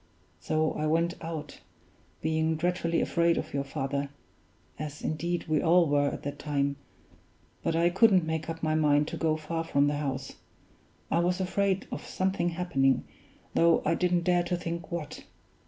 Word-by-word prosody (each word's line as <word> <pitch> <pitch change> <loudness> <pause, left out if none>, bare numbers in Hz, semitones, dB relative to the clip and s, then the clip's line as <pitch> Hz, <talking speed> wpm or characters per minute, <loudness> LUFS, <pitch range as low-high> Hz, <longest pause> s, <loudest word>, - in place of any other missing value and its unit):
So 155 0 0
I 155 - -2
went 165 +2 +2
out, 160 -2 -6 0.6
being 160 0 +1
dreadfully 170 0 0
afraid 170 0 +2
of - - -4
your 140 -1 0
father 140 0 -3 0.7
as 150 0 -6
indeed 170 +3 -2
we 155 -2 +2
all 175 +1 +5
were 145 -1 +2
at - - -4
that 145 0 -5
time 140 -1 -1 0.8
but 165 - 0
I 170 +1 +3
couldn't 190 -3 +5
make 160 0 -3
up 165 0 -5
my 155 0 +1
mind 150 -1 +3
to - - -5
go 155 -1 +1
far 165 +1 -3
from 140 -3 +2
the 145 0 0
house; 135 -2 -4 0.7
I 165 - +3
was 180 +2 +1
afraid 190 +1 0
of - - -5
something 185 -2 -1
happening, 140 -7 +1 0.5
though 170 0 +4
I - - +3
didn't 175 0 +1
dare 175 0 +3
to 175 0 -1
think 170 -1 -5
what. 170 -4 -5
160 Hz, 170 wpm, -29 LUFS, 150-175 Hz, 0.8 s, all